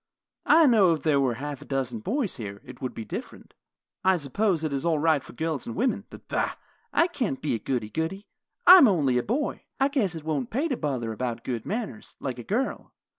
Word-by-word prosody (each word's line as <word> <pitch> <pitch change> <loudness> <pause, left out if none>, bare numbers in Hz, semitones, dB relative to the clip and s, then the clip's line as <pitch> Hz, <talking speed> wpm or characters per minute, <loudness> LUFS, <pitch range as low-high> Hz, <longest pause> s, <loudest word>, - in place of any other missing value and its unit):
I 325 0 +7
know 205 - +5
if 150 - -10
there 150 -3 +3
were 130 -4 +1
half 145 +2 -6
a - - -10
dozen 130 -4 -2
boys 225 - -2
here, 100 -4 -6
it 130 -1 -12
would 130 - -4
be 110 - -6
different. - - -8 0.5
I 190 -1 +4
suppose 170 +4 0
it 155 -3 -1
is 135 - -1
all 165 -2 +2
right 155 -1 +3
for - - -13
girls 160 0 -3
and 115 - -5
women, 240 -5 0
but, - - -13
bah! - - 0 0.4
I 335 - +4
can't 260 - -2
be 150 - -1
a 115 - -1
goody 120 -4 -2
goody. 165 +6 -3 0.4
I 365 +1 +11
am 275 - +8
only 140 - +2
a - - +1
boy. 260 - -2 0.2
I 270 +1 +3
guess 220 - 0
it 160 - -7
won't 150 -5 -2
pay 280 +8 0
to 260 - 0
bother 130 - -2
about 120 0 -3
good 120 -3 -4
manners, 215 0 -5
like 125 -3 -4
a - - -6
girl. 245 - -2
155 Hz, 230 wpm, -26 LUFS, -, 0.5 s, I